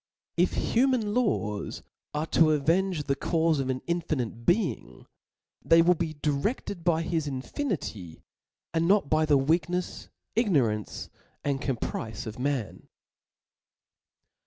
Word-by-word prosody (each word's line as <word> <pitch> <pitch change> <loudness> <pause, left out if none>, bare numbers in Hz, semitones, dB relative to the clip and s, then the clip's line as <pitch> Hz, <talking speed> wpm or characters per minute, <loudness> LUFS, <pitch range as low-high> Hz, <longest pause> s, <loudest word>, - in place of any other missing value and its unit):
If - - +2
human 240 -4 +1
laws 155 - -1 0.3
are 150 +1 0
to 160 -1 +6
avenge 165 +3 +1
the 140 - 0
caufe 160 +1 +1
of 135 -1 -1
an 130 0 -2
infinite' 140 -9 -2
Being, 185 -1 0 0.6
they 165 0 +6
will 180 +1 +5
be 165 -2 -3
direfted 155 - -2
.by 165 -1 +2
his 165 -3 -1
infinity, 130 - -4 0.5
and 165 0 +2
not 195 -6 +3
by 155 0 +3
the 145 -2 +5
weaknefs, 170 +5 0 0.3
ignorance, 135 - +1 0.3
and 140 -1 -1
caprice 115 -4 -3
of 110 +1 -7
man. 135 -5 -2
155 Hz, 120 wpm, -28 LUFS, 135-180 Hz, 0.6 s, to